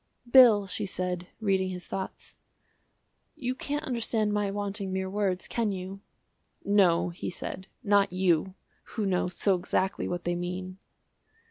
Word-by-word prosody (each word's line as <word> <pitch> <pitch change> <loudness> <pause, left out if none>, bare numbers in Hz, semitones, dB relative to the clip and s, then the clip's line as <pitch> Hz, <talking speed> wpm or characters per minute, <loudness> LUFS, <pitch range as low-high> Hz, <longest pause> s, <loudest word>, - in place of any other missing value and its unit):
"Bill," 240 -5 +7
she 200 +2 -3
said, 180 -1 -3
reading 190 -3 +1
his 180 -1 -6
thoughts, 190 -1 -6 1.0
"you 250 -1 -2
can't 290 +3 -3
understand 225 -3 0
my 205 -1 +1
wanting 200 -1 -3
mere 190 0 -1
words, 195 -3 -1
can 230 -3 0
you?" 190 +1 -6 0.6
"No," 190 -4 +4
he 175 - -5
said, 190 +1 -6 0.2
"not 200 -3 +4
you, 185 0 +1 0.4
who 215 - +1
know 180 -2 +1
so 185 +2 +1
exactly 185 +1 -1
what 175 0 -3
they 175 - 0
mean." 180 +2 -5
190 Hz, 140 wpm, -28 LUFS, 180-205 Hz, 1.0 s, Bill